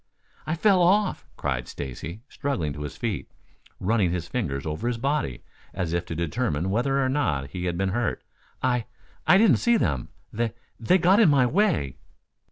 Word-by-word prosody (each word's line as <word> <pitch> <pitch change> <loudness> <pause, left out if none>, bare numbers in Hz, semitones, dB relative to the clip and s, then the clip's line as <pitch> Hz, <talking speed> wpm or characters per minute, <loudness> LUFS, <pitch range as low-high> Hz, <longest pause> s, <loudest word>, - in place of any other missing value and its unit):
"I 155 - 0
fell 190 +1 +4
off," 195 +3 +2
cried 60 -4 -2
Stacy, 70 - -6
struggling 125 - -2
to 75 - -8
his 75 -4 -6
feet, - - -3 0.5
running 105 -2 +2
his 85 -1 -3
fingers 75 - -2
over 80 +9 -3
his 120 -1 0
body, 135 - -1 0.3
as 90 -3 -2
if 85 0 -1
to 80 - -4
determine 85 +1 -1
whether 135 +6 +1
or 135 - +2
not 80 - 0
he 90 -1 -4
had 85 -1 -1
been 95 +1 0
hurt. 115 +3 -1 0.4
"I 125 -3 +1 0.4
I 185 - +7
didn't 195 - +5
see 235 - +3
them. 70 - -1 0.3
Th 115 0 0 0.3
they 120 +11 +4
got 185 +4 +4
in 215 -8 +6
my 135 -3 +5
way." 155 - +1
110 Hz, 175 wpm, -25 LUFS, -, 0.5 s, I